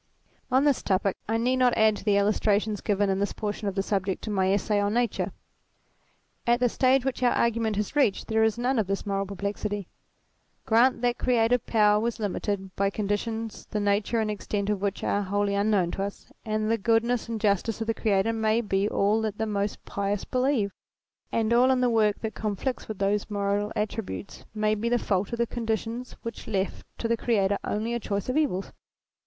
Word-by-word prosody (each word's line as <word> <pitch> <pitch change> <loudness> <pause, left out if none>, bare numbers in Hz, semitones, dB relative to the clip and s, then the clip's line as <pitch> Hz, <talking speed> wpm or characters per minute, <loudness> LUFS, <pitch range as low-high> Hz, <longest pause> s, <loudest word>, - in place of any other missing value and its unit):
On 260 +2 +4
this 290 -3 +3
topic 195 0 +1
I 225 - +2
need 250 +3 +1
not 250 -1 +3
add 220 -1 +4
to - - -10
the 205 -1 +3
illustrations 210 0 +1
given 205 -1 +1
of 190 - 0
this 200 - -1
portion 210 -1 -3
of 195 - -2
the 195 - 0
subject 195 -2 -1
in 215 - -3
my 190 -1 +2
Essay 205 +1 +1
on 205 +2 0
Nature. 240 -3 0 1.2
At 240 0 +4
the 250 -1 +3
stage 260 +2 +3
which 265 -1 -2
our 245 -1 +4
argument 230 -2 +1
has 210 +6 -2
reached 270 -9 +2
there 220 0 +2
is 220 0 +2
none 245 +1 +1
of 210 - 0
this 195 +2 -2
moral 195 -1 -1
perplexity. 200 0 -4 0.8
Grant 240 +2 +3
that 245 0 +1
creative 245 -1 +2
power 210 -2 +4
was 230 +1 -2
limited 200 -2 -3
by 200 0 +2
conditions 215 +2 -3
the 210 - -2
nature 205 +3 +1
and 215 -1 0
extent 205 0 -2
of 200 -2 -2
which 200 -1 -2
are 205 - +1
wholly 205 +1 0
unknown 200 -3 +2
to - - -4
us, 200 0 -7
and 215 0 -1
the 230 - +1
goodness 230 +2 +1
and 225 -1 -2
justice 210 +1 +1
of 225 - -2
the 225 - 0
Creator 210 0 +1
may 220 0 +2
be 200 -2 0
all 210 +3 +2
that 215 -2 -2
the 220 - -1
most 205 -1 -2
pious 200 0 -2
believe; 255 -5 +1 0.6
and 225 0 +1
all 245 +2 +5
in 260 -1 +3
the 250 -1 +2
work 215 -2 +2
that 220 -1 -3
conflicts 215 +4 -3
with 215 - -5
those 200 +2 0
moral 205 0 -1
attributes 210 -2 -4
may 215 0 +2
be 220 +2 -1
the 245 - +3
fault 195 -4 -1
of 235 - -2
the 235 - +2
conditions 230 +1 -3
which 230 -1 -7
left 195 -3 -2
to 230 - -2
the 230 - +2
Creator 200 -4 +1
only 220 +3 -2
a 235 - -1
choice 200 0 -3
of 255 - 0
evils. 275 -12 0
215 Hz, 205 wpm, -27 LUFS, 200-230 Hz, 1.2 s, all